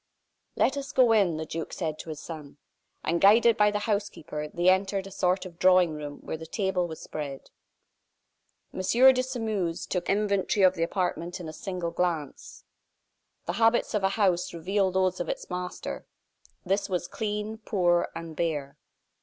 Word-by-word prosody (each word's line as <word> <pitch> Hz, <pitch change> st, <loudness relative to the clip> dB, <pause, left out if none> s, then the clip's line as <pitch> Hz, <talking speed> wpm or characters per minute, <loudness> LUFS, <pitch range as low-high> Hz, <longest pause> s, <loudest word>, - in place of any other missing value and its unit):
"Let 270 Hz, -, +2 dB
us 275 Hz, 0 st, -5 dB
go 250 Hz, -3 st, +5 dB
in," 195 Hz, -7 st, +3 dB
the 160 Hz, -, -4 dB
duke 160 Hz, +1 st, -5 dB
said 155 Hz, -4 st, -3 dB
to -, -, -8 dB
his 155 Hz, -2 st, -6 dB
son. 150 Hz, -4 st, -9 dB, 0.5 s
And 170 Hz, +1 st, 0 dB
guided 225 Hz, +3 st, +6 dB
by 210 Hz, -2 st, +4 dB
the 210 Hz, -, -1 dB
housekeeper, 200 Hz, -8 st, -3 dB
they 175 Hz, +3 st, -1 dB
entered 190 Hz, +1 st, +3 dB
a 195 Hz, -, -9 dB
sort 185 Hz, 0 st, 0 dB
of 175 Hz, -2 st, -11 dB
drawing 180 Hz, -2 st, +5 dB
room, 145 Hz, -1 st, -7 dB
where -, -, -5 dB
the 160 Hz, +1 st, -9 dB
table 190 Hz, -1 st, 0 dB
was 160 Hz, -1 st, -8 dB
spread. 140 Hz, -3 st, -7 dB, 1.2 s
M. -, -, -6 dB
de 255 Hz, +7 st, +5 dB
Sairmeuse 220 Hz, -9 st, -2 dB
took 180 Hz, -2 st, -3 dB
an 195 Hz, -, +3 dB
inventory 200 Hz, -1 st, +1 dB
of 185 Hz, -1 st, +6 dB
the 170 Hz, -, -5 dB
apartment 175 Hz, 0 st, -2 dB
in 175 Hz, -, -7 dB
a 155 Hz, -, -7 dB
single 180 Hz, 0 st, -4 dB
glance. 165 Hz, -5 st, -3 dB, 0.8 s
The 175 Hz, -, -2 dB
habits 225 Hz, +1 st, +3 dB
of 210 Hz, -2 st, 0 dB
a 195 Hz, -, +4 dB
house 180 Hz, -5 st, +1 dB
reveal 190 Hz, +4 st, +1 dB
those 185 Hz, 0 st, +1 dB
of 175 Hz, -, -3 dB
its -, -, -5 dB
master. 180 Hz, 0 st, -5 dB, 0.6 s
This 195 Hz, +3 st, 0 dB
was 180 Hz, -2 st, -1 dB
clean, 215 Hz, 0 st, -3 dB
poor, 175 Hz, -6 st, +1 dB
and 165 Hz, -1 st, -7 dB
bare. 150 Hz, -4 st, -2 dB
180 Hz, 175 wpm, -27 LUFS, 165-205 Hz, 1.2 s, guided